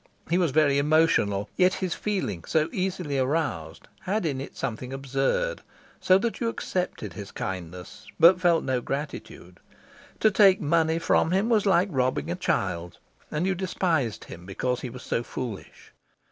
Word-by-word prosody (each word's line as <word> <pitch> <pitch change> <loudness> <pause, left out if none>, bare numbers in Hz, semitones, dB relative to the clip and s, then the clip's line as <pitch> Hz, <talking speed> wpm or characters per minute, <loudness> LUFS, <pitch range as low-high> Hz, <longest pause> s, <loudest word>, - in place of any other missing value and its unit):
He 175 - +3
was 175 -3 +2
very 140 -1 +3
emotional, 140 -10 +2
yet 185 0 +4
his 185 -2 -2
feeling, 190 - -3
so 160 0 +1
easily 180 -7 -2
aroused, 130 - -2
had 200 0 -2
in 135 -4 -1
it 140 - -9
something 125 +3 -4
absurd, 135 - -1 0.4
so 185 - +5
that 225 +3 -2
you 230 - 0
accepted 180 - -3
his 100 -2 -8
kindness, 90 -1 -7
but 180 +2 +7
felt 170 -2 +3
no 130 -2 -1
gratitude. 135 - -6 0.6
To 215 - +5
take 195 -2 +5
money 160 +1 +2
from 165 -1 +2
him 195 +6 +1
was 215 -3 +2
like 190 +1 +3
robbing 130 -2 0
a - - -1
child, 85 0 -2 0.3
and 155 +4 -1
you 190 - +1
despised 170 - -1
him 85 +1 -11
because 125 +6 -2
he 125 - -5
was 125 +1 -10
so - - -1
foolish. 120 -3 -8
150 Hz, 160 wpm, -26 LUFS, 125-185 Hz, 0.6 s, but